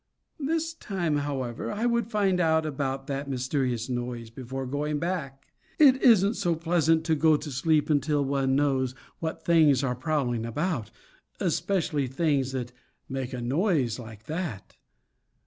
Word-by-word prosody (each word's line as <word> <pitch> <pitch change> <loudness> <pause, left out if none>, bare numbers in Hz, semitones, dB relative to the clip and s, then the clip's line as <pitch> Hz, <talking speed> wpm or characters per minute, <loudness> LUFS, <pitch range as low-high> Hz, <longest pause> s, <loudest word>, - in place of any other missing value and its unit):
This 325 +3 -1
time, 180 - -2
however, 135 -5 -3
I 210 +3 -2
would 235 -2 +1
find 200 -5 +1
out 160 -2 +3
about 135 -2 -2
that 140 0 -4
mysterious 130 -2 -1
noise 120 -2 -4
before 130 +2 -5
going 145 +3 -2
back. 150 -5 -3 0.3
It 270 -3 +6
isn't 215 -4 +5
so 175 -6 0
pleasant 165 -1 +2
to 160 0 +1
go 155 0 +4
to 150 0 -7
sleep 150 +4 +2
until 145 -1 +1
one 135 -1 +1
knows 135 -3 +1 0.2
what 160 -1 -4
things 155 -6 +5
are 125 -2 0
prowling 125 -3 -1
about, 120 - -2 0.5
especially 160 -8 0
things 135 -1 0
that 125 -2 -4 0.4
make 130 -1 -4
a 125 -2 -4
noise 135 - +1
like 110 -3 -10
that. 155 - -5
145 Hz, 145 wpm, -27 LUFS, 130-170 Hz, 0.5 s, It